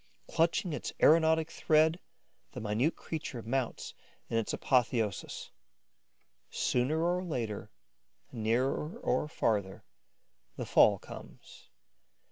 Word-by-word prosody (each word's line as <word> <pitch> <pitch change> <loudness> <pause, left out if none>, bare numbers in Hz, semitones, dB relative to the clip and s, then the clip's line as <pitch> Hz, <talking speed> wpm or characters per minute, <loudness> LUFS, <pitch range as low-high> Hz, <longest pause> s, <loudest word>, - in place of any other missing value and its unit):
Clutching 165 +1 +1
its - - -4
aeronautic 160 0 +4
thread, 160 +2 +3 0.5
the 130 - -6
minute 115 +8 0
creature 145 -7 -6
mounts 125 +1 -2 0.4
in 115 - +1
an 115 - +1
apotheosis. 115 -5 0 1.0
Sooner 145 +6 0
or 180 +1 +1
later, 115 - -4 0.6
nearer 125 +7 -1
or 130 +4 0
farther, 105 -9 -1 0.7
the - - -4
fall - - +5
comes. - - -13
130 Hz, 95 wpm, -31 LUFS, 115-160 Hz, 1.0 s, fall